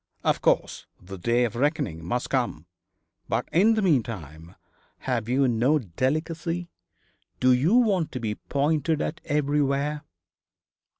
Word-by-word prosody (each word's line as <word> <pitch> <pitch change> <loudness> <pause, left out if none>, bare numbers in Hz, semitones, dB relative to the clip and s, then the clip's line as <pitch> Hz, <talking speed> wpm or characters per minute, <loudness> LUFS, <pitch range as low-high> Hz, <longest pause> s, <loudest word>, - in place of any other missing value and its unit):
'Of - - +1
course. - - 0
The 95 +1 -10
day 120 +6 +2
of 115 -1 -4
reckoning 120 - -1
must 120 +9 -3
come. 120 - -1 0.6
But - - -1
in 210 +7 +4
the 215 - 0
meantime 95 - -2 0.5
have 120 -4 -2
you 135 +2 +3
no 125 +6 +2
delicacy? 160 - -2 0.7
Do 130 0 +4
you 150 - +3
want 200 - +2
to 130 - -3
be 110 -3 -2
pointed 150 +5 0
at 165 - -3
everywhere?' 145 0 0
135 Hz, 130 wpm, -25 LUFS, 115-155 Hz, 0.7 s, in